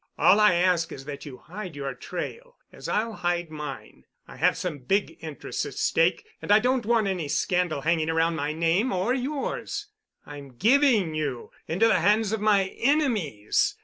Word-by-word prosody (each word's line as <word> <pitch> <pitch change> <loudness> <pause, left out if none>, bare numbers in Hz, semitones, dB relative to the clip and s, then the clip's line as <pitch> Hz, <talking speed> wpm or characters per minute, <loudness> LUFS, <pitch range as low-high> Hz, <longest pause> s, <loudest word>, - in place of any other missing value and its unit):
All 200 - +5
I 210 -4 +5
ask 175 -2 +2
is 135 - -9
that 145 +1 -7
you 130 -3 -9
hide 185 -1 -8
your 140 -2 -4
trail, 460 - -7 0.2
as - - -8
I'll 225 +1 0
hide 175 -3 -2
mine. 150 -3 -8 0.2
I - - -12
have - - +2
some 175 -6 -4
big 195 +11 0
interests 155 -5 -5
at - - -9
stake, 170 - +1 0.2
and - - -3
I 210 - +8
don't 245 0 0
want 230 -2 +3
any 185 -6 -2
scandal 175 0 0
hanging 160 +1 +1
around 165 +1 +1
my 145 -1 -2
name—or 185 +7 +1
yours. 300 +10 -3 0.4
I'm 140 -3 -11
giving 230 - +3
you 145 -6 -4 0.2
into 190 +8 +2
the 225 - +3
hands 210 0 +2
of 220 -1 -2
my 200 -3 +3
enemies. 225 - +1
180 Hz, 175 wpm, -26 LUFS, 155-220 Hz, 0.4 s, I